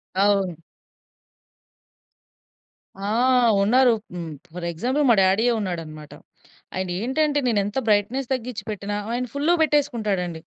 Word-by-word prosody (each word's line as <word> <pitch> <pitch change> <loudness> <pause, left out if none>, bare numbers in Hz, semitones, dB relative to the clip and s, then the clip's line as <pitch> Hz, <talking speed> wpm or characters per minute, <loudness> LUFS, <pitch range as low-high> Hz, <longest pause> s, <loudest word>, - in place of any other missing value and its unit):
అవును. 195 -3 +2 2.4
ఆ! 200 +1 -5 0.5
ఉన్నారు. 245 +3 +4 0.2
హ్మ్. 165 -2 -5 0.2
ఫర్ 175 -1 -6
ఎగ్జాంపుల్ 255 - 0
మా 230 - +6
డ్యాడీ‌యే 205 +6 +3
ఉన్నాడనమాట. 160 -6 -6 0.6
ఆయనేంటంటే 245 - 0
నేనెంత 205 -1 0
బ్రైట్‌నెస్ 230 +6 +1
తగ్గించి 250 -2 -4
పెట్టిన 205 0 -5 0.2
ఆయన 245 +1 -1
ఫుల్లుగా 325 +4 +2
పెట్టేసుకుంటాడండి. 215 - 0
205 Hz, 100 wpm, -23 LUFS, 185-250 Hz, 2.4 s, మా